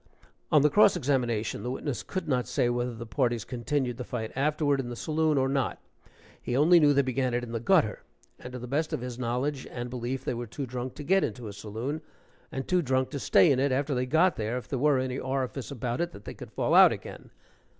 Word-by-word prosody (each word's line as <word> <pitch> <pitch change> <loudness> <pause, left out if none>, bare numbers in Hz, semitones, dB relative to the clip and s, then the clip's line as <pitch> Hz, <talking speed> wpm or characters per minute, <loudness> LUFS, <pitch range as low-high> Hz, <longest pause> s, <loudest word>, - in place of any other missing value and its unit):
(On 150 - +5
the 150 - +5
cross 205 +3 +6
examination, 125 -8 0
the 125 - -4
witness 130 +1 -3
could 185 -4 -5
not 125 -4 0
say 120 - +1
whether 120 0 -1
the 115 +1 -7
parties 120 -2 0
continued 125 0 -2
the 125 - -4
fight 110 -3 -4
afterward 145 0 +1
in 125 -2 -3
the 120 - -5
saloon 155 +4 0
or 135 0 +2
not 135 -1 -1 0.6
he 125 - -2
only 170 +5 +6
knew 150 -2 +5
they 140 0 +3
began 130 -1 -1
it 120 - -1
in 120 - -7
the 115 - -2
gutter, 145 - +2 0.4
and 125 - -9
to - - -4
the 125 - -7
best 145 +5 -1
of - - -2
his 125 -1 -6
knowledge 130 +3 -2
and 120 0 -6
belief 125 +1 -4
they - - -1
were 120 0 -5
too 135 +6 -5
drunk 125 0 -5
to 150 - -7
get 190 +5 +3
into 120 -3 -4
a 100 - -7
saloon, 110 +9 -5 0.5
and 135 0 -4
too 180 -1 +2
drunk 130 -3 0
to 145 - -4
stay 155 - +5
in 130 - +2
it 140 0 +2
after 140 +2 0
they 125 0 -1
got 165 +6 +3
there 110 +3 -2
if 125 - -7
there 135 - -2
were 145 0 +3
any 130 0 -2
orifice 130 -2 -3
about 125 0 -3
it 175 -1 -2
that 100 - -12
they - - -6
could - - -10
fall - - 0
out - - +8
again. - - -8
130 Hz, 245 wpm, -28 LUFS, 120-145 Hz, 0.6 s, out